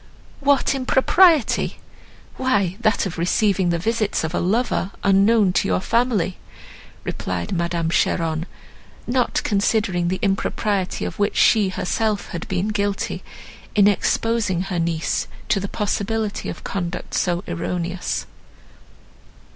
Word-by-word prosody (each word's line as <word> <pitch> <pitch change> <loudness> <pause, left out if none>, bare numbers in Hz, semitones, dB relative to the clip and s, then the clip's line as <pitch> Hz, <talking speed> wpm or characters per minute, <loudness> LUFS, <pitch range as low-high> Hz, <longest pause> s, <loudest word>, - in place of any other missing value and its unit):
"What 280 0 +3
impropriety! 280 +3 +3 0.6
why 205 -9 +1
that 215 -3 +2
of 180 -3 -5
receiving 185 +1 +2
the 170 - +1
visits 215 +2 0
of 160 +1 -3
a - - 0
lover 205 +1 0
unknown 200 0 +4
to 195 - +1
your - - +1
family," 225 -4 0 0.6
replied 90 -2 -4
Madame 170 -1 -1
Cheron, 165 0 0 0.6
not 250 0 0
considering 200 -3 +1
the 185 +2 0
impropriety 195 0 -1
of - - -6
which 205 - +1
she 210 -4 +4
had 185 - -7
herself 215 +2 -1
been 190 +2 -1
guilty, 205 -1 -2 0.5
in 205 -1 +6
exposing 205 -2 +1
her 190 -2 -3
niece 165 -1 -1 0.2
to 225 -4 +3
the 200 - -3
possibility 210 0 -2
of - - -7
conduct 180 -2 -4
so 175 0 0
erroneous. 175 +1 -3
195 Hz, 125 wpm, -22 LUFS, 175-220 Hz, 0.6 s, in